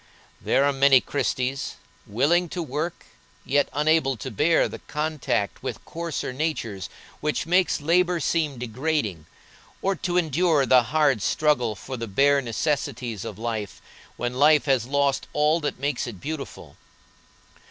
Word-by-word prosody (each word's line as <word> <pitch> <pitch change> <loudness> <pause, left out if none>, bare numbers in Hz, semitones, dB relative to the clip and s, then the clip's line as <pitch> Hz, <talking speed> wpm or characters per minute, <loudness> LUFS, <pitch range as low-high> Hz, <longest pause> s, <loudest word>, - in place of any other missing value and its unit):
There 140 - +2
are 145 - +2
many 135 -1 +6
Christies, 130 0 -2 0.3
willing 160 - +2
to 175 +1 -3
work, 155 +4 -4 0.4
yet 145 +1 +2
unable 150 -3 +2
to 130 +4 -6
bear 160 +10 +3
the - - -8
contact 150 -9 -2
with - - -6
coarser 165 -5 -4
natures 115 - -3 0.3
which 150 0 -1
makes 180 +1 +2
labor 175 +3 +2
seem 155 -3 0
degrading, 120 - -2 0.5
or 195 0 0
to 175 0 -1
endure 160 -3 +2
the 130 -1 +6
hard 145 -3 +2
struggle 125 -5 +1
for 130 +5 -7
the 115 0 -5
bare 140 +7 +3
necessities 125 -3 -2
of 100 - -7
life 110 -3 -4 0.4
when 120 0 -2
life 150 +3 +4
has 130 -5 +1
lost 140 0 +1
all 150 +2 +3
that 145 -3 -3
makes 140 -1 -2
it 105 -6 -8
beautiful. 150 - -7
140 Hz, 140 wpm, -24 LUFS, 125-155 Hz, 0.5 s, many